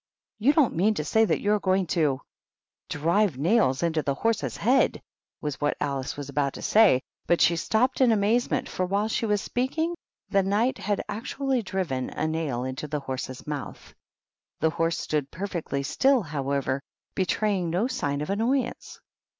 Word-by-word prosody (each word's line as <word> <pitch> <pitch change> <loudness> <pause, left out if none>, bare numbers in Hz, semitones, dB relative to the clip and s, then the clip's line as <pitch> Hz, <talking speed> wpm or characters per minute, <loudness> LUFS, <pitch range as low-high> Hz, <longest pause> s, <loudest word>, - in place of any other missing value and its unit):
"You 260 +7 +4
don't 295 -5 +3
mean 205 +6 +2
to 150 - -2
say 220 +8 +3
that - - 0
you 205 +1 +2
are 210 - +2
going 190 -1 +1
to 145 -6 +1 0.2
" - - -68
" - - -59
drive 170 +2 +1
nails 160 - +2
into 165 -2 +1
the 140 -2 -1
horse's 225 +7 -1
head," 255 +5 +3 0.4
was 150 -2 -4
what 145 - +1
Alice 140 0 -2
was 145 -2 -5
about 140 -1 -1
to - - -8
say, 200 -12 +5 0.2
but 175 - +3
she 170 - +4
stopped 235 +10 +1
in 250 -3 +6
amazement, 220 +3 +1
for 185 - -2
while 200 +3 +1
she 225 +1 -1
was 210 -1 +1
speaking, 315 +7 -1 0.3
the 195 - +3
Knight 205 +6 +1
had 205 +1 -1
actually 255 +5 -2
driven 180 - -2
a - - -3
nail 155 -6 -2
into 130 +3 -4
his 150 -2 -2
horse's 130 -1 -5
mouth. 145 -2 -6 0.7
The 160 - +2
horse 165 0 0
stood 150 -3 -2
perfectly 170 -7 -3
still, 265 - +3
however, 140 -3 -2 0.3
betraying 190 -1 0
no 180 +7 +1
sign 145 - -2
of 150 - -3
annoyance. 245 +5 -1
185 Hz, 175 wpm, -26 LUFS, 145-220 Hz, 0.7 s, in